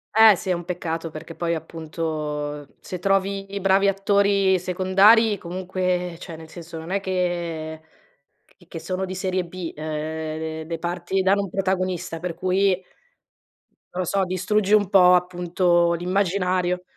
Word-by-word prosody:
Eh 220 -2 +8
sì, 185 - -6
è 185 - +3
un 170 -1 -4
peccato 165 -2 -4
perché 160 +2 -9
poi 170 -1 -1
appunto 155 -3 -4
se 180 - -6
trovi 195 +1 0 0.2
bravi 195 +1 +4
attori 195 -1 +3
secondari 195 +4 +4
comunque, 180 -1 -2
cioè 170 - -8
nel 160 0 -12
senso 165 -1 -9
non 160 - -9
è 195 +2 0
che 170 -4 -3 0.9
che 165 - -7
sono 185 +2 -3
di 185 0 -6
serie 185 -1 -1
B, 175 -1 -6
uhm, 155 +1 -4
le 165 - -3
parti 175 +2 -2
danno 200 +2 +3
un 195 - -6
protagonista 185 -3 -2
per 175 0 -4
cui 185 +1 +1 1.1
non 185 - -2
lo - - -4
so, 195 +3 +1
distruggi 190 +3 0
un 205 -2 +5
po' 180 -3 +7
appunto 175 -1 +2
l'immaginario. 180 0 0
180 Hz, 145 wpm, -23 LUFS, 165-190 Hz, 1.1 s, Eh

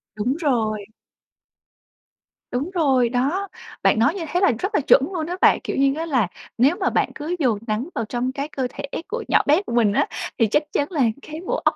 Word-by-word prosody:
Đúng 230 +6 -1
rồi. 225 - 0 1.7
Đúng 260 +7 -2
rồi 265 -8 +3
đó, 280 +11 0 0.4
bạn - - +4
nói 230 +8 +4
như 355 -4 -4
thế 350 - 0
là 390 - +5
rất 385 - -2
là 290 - +3
chuẩn 280 0 +5
luôn 320 -3 -2
á 360 +2 -4
bạn. - - +5
Kiểu - - -3
như 275 0 +3
á 320 +2 -3
là 255 - +1 0.3
nếu 270 +8 +4
mà - - +1
bạn - - 0
cứ 310 +4 -3
dồn 240 -8 +1
nắng 220 +8 -2
vào 225 - -1
trong 245 +3 -2
cái 280 +2 -4
cơ 265 -4 -3
thể - - -8 0.2
của 460 +3 -4
nhỏ - - +4
bé 300 +6 +5
của - - -5
mình 225 -4 +3
á - - +2 0.3
thì 225 - +3
chắc 295 +9 +2
chắn 290 +3 -1
là 310 -6 0 0.2
cái 310 +3 -8
bộ - - -1
óc - - +3
275 Hz, 225 wpm, -22 LUFS, 240-325 Hz, 1.7 s, là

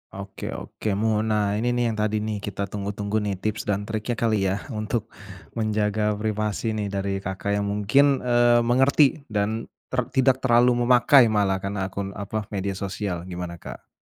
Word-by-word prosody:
Oke 100 0 -7
oke 110 - -4
mu 105 +1 +1
nah 105 -2 +1
ini 120 +3 0
nih 120 0 +1
yang 115 - -1
tadi 110 0 0
nih 105 -1 -4
kita 100 -1 -3
tunggu-tunggu 100 +1 -3
nih 100 -3 -2
tips 110 +2 -2
dan 100 0 -2
triknya 110 +2 -2
kali 110 -4 +1
ya 95 +1 0
untuk, 110 -2 -3 0.5
menjaga 105 -1 0
privasi 110 +1 -1
nih 105 -2 -3
dari 95 0 -2
Kakak 95 +2 -2
yang 100 - 0
mungkin, 135 +8 +3
eee, 120 -1 +4
mengerti 135 +4 +3
dan 110 +2 -2 0.2
ter 125 -1 -1
tidak 130 0 +2
terlalu 120 -1 +4
memakai 125 0 +6
malah 95 -3 +1
karena 100 -1 -2
akun 100 +1 -5
apa 105 +2 -4
media 100 -1 -2
sosial 95 -2 -4
gimana 90 -1 -6
Kak? 85 - -10
105 Hz, 170 wpm, -24 LUFS, 100-115 Hz, 0.5 s, memakai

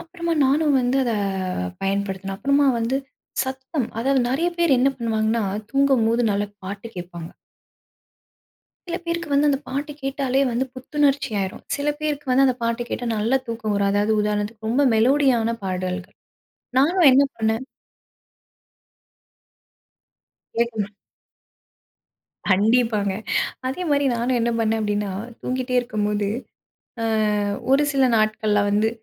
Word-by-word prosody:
அப்பறமா 335 0 -4
நானும் 290 +2 +3
வந்து 250 +1 +1
அத, 240 -2 0 0.7
பயன்படுத்தினேன். 195 0 -2
அப்பறமா 280 +4 +2
வந்து 235 +4 0 0.5
சத்தம். 265 -1 -3
அதாவது 270 +2 +2
நெறையா 325 +7 +1
பேரு 305 -7 +4
என்ன 270 - +4
பண்ணுவாங்கன்னா, 220 -1 0 0.3
தூங்கும் 275 -4 +3
போது 230 -1 +2
நல்லா 205 0 -1 0.2
பாட்டு 200 +4 -6
கேட்பாங்க. 175 -2 -7 1.6
சில 340 - -2
பேருக்கு 335 -1 -3
வந்து 290 +1 +4
அந்த 275 - +1
பாட்டு 290 +3 -3
கேட்டாலே 270 -1 0
வந்து 240 +2 0
புத்துணர்ச்சி 280 0 0
ஆயிரும். 190 -1 -4
சில 285 +1 -2
பேருக்கு 295 -2 -2
வந்து 270 +2 +5
அந்த 255 - +2
பாட்டு 230 +1 0
கேட்டா 245 - -3
நல்ல 230 +6 +2
தூக்கம் 225 -2 -2
வரும், 200 0 +2
அதாவது 205 +2 +2
உதாரணத்துக்கு 210 +1 -2
ரொம்ப 280 +4 +3
மெலோடியான 240 -1 +3
பாடல். 185 0 -2 0.8
நானும் 330 +3 +5
என்ன 275 +2 +6
பண்ணேன். 220 +2 0 2.9
கேட்கும். 225 -3 -1 1.6
கண்டிப்பாங்க. 210 0 +3 0.5
அதே 270 +8 -3
மாரி 285 0 +3
நானும் 245 +1 0
என்ன 235 - +1
பண்ணேன் 225 0 +1
அப்டின்னா, 205 -1 -1 0.3
தூங்கிட்டே 255 0 -2
இருக்கும் 215 -4 -2
போது, 205 -1 0 0.7
அ, - - -1 0.7
ஒரு 280 +2 +5
சில 275 -1 +2
நாட்கள்ல 215 -1 +2
வந்து, 210 +2 +2
235 Hz, 125 wpm, -23 LUFS, 210-275 Hz, 2.9 s, என்ன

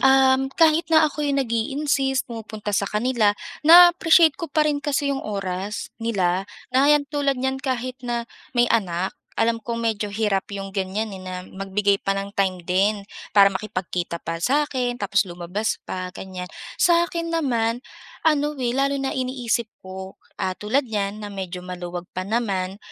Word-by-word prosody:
um, 265 0 +5
kahit 325 0 +4
na 315 -1 +5
ako 300 0 -3
yung 280 -1 +2
nag-i-insist, 270 +3 0
pumupunta 215 -2 -6
sa 200 0 +1
kanila, 215 -1 +2 0.3
naa-appreciate 340 -2 +7
ko 335 - -3
pa 305 +1 +2
rin 295 -1 +1
kasi 285 0 0
yung 275 - -1
oras 195 -1 -4
nila, 195 -5 0 0.2
na 265 +3 +4
ayan, 295 -1 +5
tulad 285 -2 +1
niyan 265 +1 -1
kahit 255 -1 -3
na 240 -1 -1 0.3
may 240 0 +3
anak, 185 -4 +1 0.2
alam 230 0 +1
kong 230 +1 -4
medyo 210 -3 -1
hirap 205 -3 0
yung 195 0 -5
ganyan, 195 +3 -2
eh, 195 - -7
na 185 -1 -6
magbigay 195 +2 0
pa 195 - +2
ng 195 0 -4
time 185 -2 +1
din 195 +4 +1 0.3
para 200 -1 +7
makipagkita 185 -4 -4
pa 165 0 -3
sa'kin, 255 - +1
tapos 200 -3 +1
lumabas 180 +5 -3
pa, 185 0 -5
ganyan. 185 -2 -7 0.3
Sa'kin 340 -1 +2
naman, 240 -6 0 0.4
ano, 300 -1 +2
eh, 240 - +1
lalo 275 +3 +1
na 270 -1 -1
iniisip 250 -3 -1 0.2
ko, 190 0 -8 0.2
ah, 185 0 -1
tulad 255 +8 0
niyan 205 -2 -2
na 205 -1 -7
medyo 180 -2 -6
maluwag 180 -1 -6
pa 185 - -2
naman 200 -4 -1
225 Hz, 160 wpm, -23 LUFS, 195-270 Hz, 0.4 s, naa-appreciate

